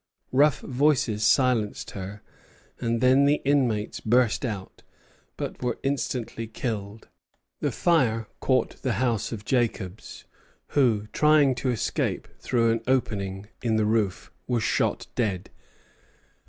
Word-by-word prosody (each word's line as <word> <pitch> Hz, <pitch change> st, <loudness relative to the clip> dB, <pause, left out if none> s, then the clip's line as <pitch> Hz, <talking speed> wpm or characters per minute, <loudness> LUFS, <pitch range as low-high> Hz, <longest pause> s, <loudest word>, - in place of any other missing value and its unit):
Rough 140 Hz, +2 st, +4 dB
voices 125 Hz, -5 st, +1 dB
silenced 125 Hz, -6 st, +2 dB
her, 100 Hz, +2 st, -7 dB, 0.6 s
and 115 Hz, 0 st, -1 dB
then 130 Hz, +2 st, +5 dB
the 145 Hz, +1 st, +3 dB
inmates 125 Hz, -7 st, +1 dB
burst 120 Hz, +1 st, +2 dB
out, 105 Hz, -6 st, -5 dB, 0.6 s
but -, -, -5 dB
were 125 Hz, -1 st, -1 dB
instantly 125 Hz, -4 st, -2 dB
killed. 110 Hz, -2 st, -5 dB, 0.5 s
The -, -, 0 dB
fire 120 Hz, -11 st, +2 dB
caught -, -, 0 dB
the -, -, 0 dB
house 120 Hz, -5 st, 0 dB
of 105 Hz, -3 st, -6 dB
Jacobs, 110 Hz, -6 st, -2 dB, 0.4 s
who, 115 Hz, -7 st, +2 dB
trying 150 Hz, -3 st, +4 dB
to 125 Hz, +1 st, -2 dB
escape 120 Hz, -3 st, -1 dB
through 115 Hz, -2 st, +2 dB
an 115 Hz, 0 st, 0 dB
opening 100 Hz, -6 st, -1 dB
in 115 Hz, -2 st, +1 dB
the 110 Hz, -1 st, +2 dB
roof, 105 Hz, -3 st, 0 dB, 0.2 s
was 120 Hz, -3 st, 0 dB
shot -, -, 0 dB
dead. 100 Hz, -7 st, -2 dB
115 Hz, 125 wpm, -26 LUFS, 105-130 Hz, 0.6 s, then